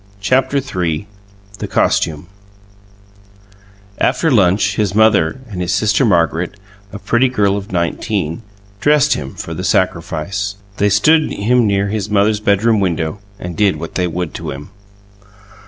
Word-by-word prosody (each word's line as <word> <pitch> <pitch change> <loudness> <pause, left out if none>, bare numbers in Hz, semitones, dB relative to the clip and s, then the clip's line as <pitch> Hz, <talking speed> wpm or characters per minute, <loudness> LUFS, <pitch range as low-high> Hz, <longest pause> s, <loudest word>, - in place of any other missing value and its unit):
CHAPTER 130 +6 +1
III 90 - -2 0.5
THE - - -4
COSTUME 75 0 0 1.7
After 135 +5 +1
lunch 100 -2 +3
his 100 -2 -1
mother 110 -1 +3
and 95 -5 -6
his 90 0 -1
sister 105 +4 +2
Margaret, 85 -2 +1 0.4
a 105 - -7
pretty 120 +5 +1
girl 100 -5 +1
of 100 0 -6
nineteen, 85 0 -2 0.4
dressed 150 +3 +3
him 70 -2 -6
for 80 - -6
the 90 +3 -5
sacrifice. 95 +2 -1 0.2
They 105 - +2
stood 155 +11 +3
him 120 +3 +2
near 100 0 +1
his 105 -1 -3
mother's 105 +1 +2
bedroom 105 +2 +2
window 85 -1 -1 0.2
and 90 -3 -7
did 100 +2 +2
what 85 - -7
they 90 -1 0
would 85 -1 -4
to - - -6
him. 75 +8 -8
100 Hz, 140 wpm, -17 LUFS, 90-110 Hz, 1.7 s, lunch